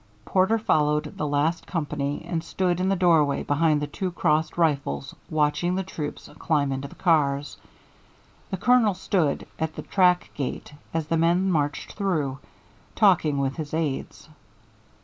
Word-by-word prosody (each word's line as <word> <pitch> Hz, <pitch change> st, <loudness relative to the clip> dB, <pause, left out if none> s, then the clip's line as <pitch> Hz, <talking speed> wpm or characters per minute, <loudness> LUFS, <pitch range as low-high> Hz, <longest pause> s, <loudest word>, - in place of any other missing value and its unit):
Porter 190 Hz, +4 st, +2 dB
followed 150 Hz, -8 st, +1 dB
the 150 Hz, -, -1 dB
last 150 Hz, +4 st, 0 dB
company 150 Hz, -3 st, -3 dB
and 165 Hz, -2 st, -2 dB
stood 175 Hz, +1 st, -1 dB
in 185 Hz, +1 st, +1 dB
the 195 Hz, -, +2 dB
doorway 165 Hz, -6 st, +3 dB
behind 150 Hz, 0 st, +1 dB
two 185 Hz, -2 st, -2 dB
crossed 160 Hz, -2 st, 0 dB
rifles 140 Hz, -, 0 dB, 0.2 s
watching 155 Hz, +4 st, +1 dB
the 190 Hz, -, -1 dB
troops 155 Hz, -5 st, -6 dB
climb 145 Hz, -4 st, +1 dB
into 135 Hz, +1 st, -3 dB
the -, -, -14 dB
cars. 145 Hz, -5 st, +1 dB, 0.9 s
The 190 Hz, -, -3 dB
Colonel 225 Hz, -1 st, +3 dB
stood 180 Hz, -6 st, 0 dB
at 160 Hz, -1 st, -2 dB
the -, -, -6 dB
track 180 Hz, -2 st, +2 dB
gate 140 Hz, +1 st, -5 dB, 0.2 s
as 160 Hz, -1 st, -1 dB
the 165 Hz, +2 st, 0 dB
men 175 Hz, +4 st, +2 dB
marched 145 Hz, -3 st, -1 dB
through, 155 Hz, -10 st, -1 dB, 0.6 s
talking 175 Hz, -9 st, +4 dB
with 135 Hz, +1 st, -1 dB
his 155 Hz, -1 st, -4 dB
aids. 155 Hz, -4 st, -3 dB
160 Hz, 150 wpm, -25 LUFS, 145-180 Hz, 0.9 s, talking